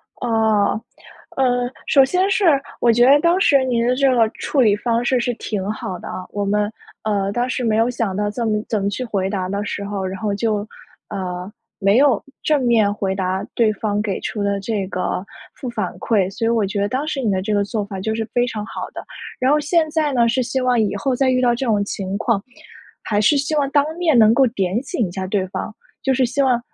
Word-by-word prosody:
哦。 220 -3 +1 0.5
呃， 245 -2 +1 0.2
首 275 - +5
先 365 +8 +1
是 390 0 +2 0.4
我 235 - +5
觉 240 +2 +4
得 280 +3 +7
当 340 +4 +3
时 280 -8 +4
您 235 -2 +1
的 250 - +2
这 275 +1 +3
个 230 -2 +4
处 285 - -1
理 215 -5 +5
方 235 +2 -1
式 255 0 +2
是 245 +1 0
挺 210 -4 -4
好 190 -4 -5
的 - - -9
啊， 185 - -6
我 205 - -2
们， 205 +1 0 0.3
呃， 200 -2 0
当 240 +4 -1
时 255 0 -2
没 220 -2 +1
有 225 +1 +3
想 230 -6 -2
到 210 0 0
怎 230 +1 -2
么 215 -1 +1
怎 215 -3 -1
么 200 - 0
去 250 +6 -4
回 195 -4 -1
答 190 -2 -2
的 200 +2 -2
时 200 0 -4
候， 200 -1 -3
然 190 0 -4
后 210 -1 -1
就， 210 0 -1 0.4
呃， 185 -1 -5 0.3
没 200 +2 +3
有 270 -5 +4 0.2
正 295 -3 +1
面 225 -4 +3
回 195 -2 -2
答 190 0 -2
对 225 -2 +3
方 210 0 -2
给 205 -3 -2
出 210 - -4
的 200 0 0
这 200 -1 -2
个 185 -1 -2 0.3
负 255 - -6
反 215 -6 -3
馈。 195 -5 +1
所 230 +4 -6
以 225 - +3
我 230 -3 +2
觉 200 +1 -2
得 200 - 0
当 270 +6 -2
时 290 -3 -2
你 230 - 0
的 190 - +1
这 205 +3 -2
个 205 -1 +2
做 205 0 -3
法 195 -2 -6
就 220 +3 -1
是 225 0 -2
非 245 0 +2
常 215 -3 -4
好 - - -6
的。 - - -6 0.4
然 260 +1 +2
后 300 - +4
现 315 +2 +2
在 305 -2 +1
呢， 235 -2 +3
是 255 +3 +1
希 260 +2 -1
望 250 -1 +2
以 205 -2 0
后 255 +6 -1
再 265 +1 +2
遇 255 0 +2
到 245 -1 +3
这 245 +2 -2
种 205 -3 +2
情 195 -1 -4
况， 220 -2 0 0.6
还 210 -1 0
是 250 +7 +4
希 285 +3 -1
望 285 -2 +1
当 285 0 +3
面 325 -7 +3
能 220 -1 +6
够 265 +2 +4
点 200 -1 -1
醒 265 - -2
一 - - -8
下 190 +1 -4
对 190 -1 0
方， 215 - -5 0.3
就 265 -1 +1
是 260 0 +3
希 255 +4 -1
望 255 -3 +3
225 Hz, 260 characters per minute, -20 LUFS, 200-255 Hz, 0.6 s, 得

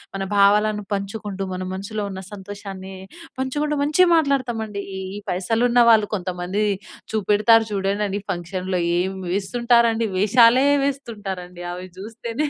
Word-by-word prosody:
మన 195 - -2
భావాలను 210 +1 +4
పంచుకుంటూ 200 0 -4
మన 185 0 -4
మనసులో 205 +3 -4
ఉన్న 190 0 -6
సంతోషాన్ని 195 -1 -8 0.5
పంచుకుంటూ 295 +3 -1
మంచిగా 345 +5 +4
మాట్లాడుతామండి. 240 -9 -1 0.2
ఈ - - -4 0.2
ఈ - - -5
పైసలు 195 +6 0
ఉన్న 245 0 +5
వాళ్ళు 215 -2 +4
కొంతమంది 185 +2 -2 0.5
చూపెడతారు 220 +2 +4
చూడండండి 200 0 -1
ఫంక్షన్‌లో 185 +1 -3 0.2
ఏమి 190 0 -3
వేస్తుంటారండి 230 +2 +2
వేషాలే 235 +6 +5 0.2
వేస్తుంటారండి. 195 -10 -5
అవి 180 +1 -7
చూస్తేనే 230 +7 -4
205 Hz, 120 wpm, -22 LUFS, 190-235 Hz, 0.5 s, ఉన్న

